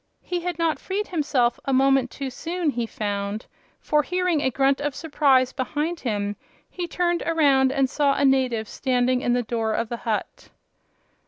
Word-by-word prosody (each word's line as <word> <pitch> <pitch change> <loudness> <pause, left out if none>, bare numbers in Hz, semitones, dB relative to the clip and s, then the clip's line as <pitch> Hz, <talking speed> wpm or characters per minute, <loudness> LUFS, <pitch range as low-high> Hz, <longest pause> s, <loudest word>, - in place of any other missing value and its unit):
He 355 -1 -2
had 350 -1 -3
not 330 -2 0
freed 405 +2 -3
himself 280 -8 +1
a 275 - -1
moment 270 -1 +3
too 270 0 -5
soon, 335 +2 -2
he 235 -3 -2
found, 205 0 -3 0.3
for 300 0 +2
hearing 360 -1 0
a 260 - +2
grunt 270 +2 +1
of 290 -2 -2
surprise 275 -5 +2
behind 300 +5 -2
him 205 -4 -2 0.4
he 355 -1 -4
turned 345 0 0
around 280 -5 +3
and 270 -1 +2
saw 280 +1 +1
a 285 - +2
native 255 -5 +2
standing 250 0 0
in 245 - +1
the 245 0 +1
door 225 -1 -1
of 230 - -2
the 235 - -3
hut. 220 -2 -4
270 Hz, 175 wpm, -24 LUFS, 245-320 Hz, 0.4 s, moment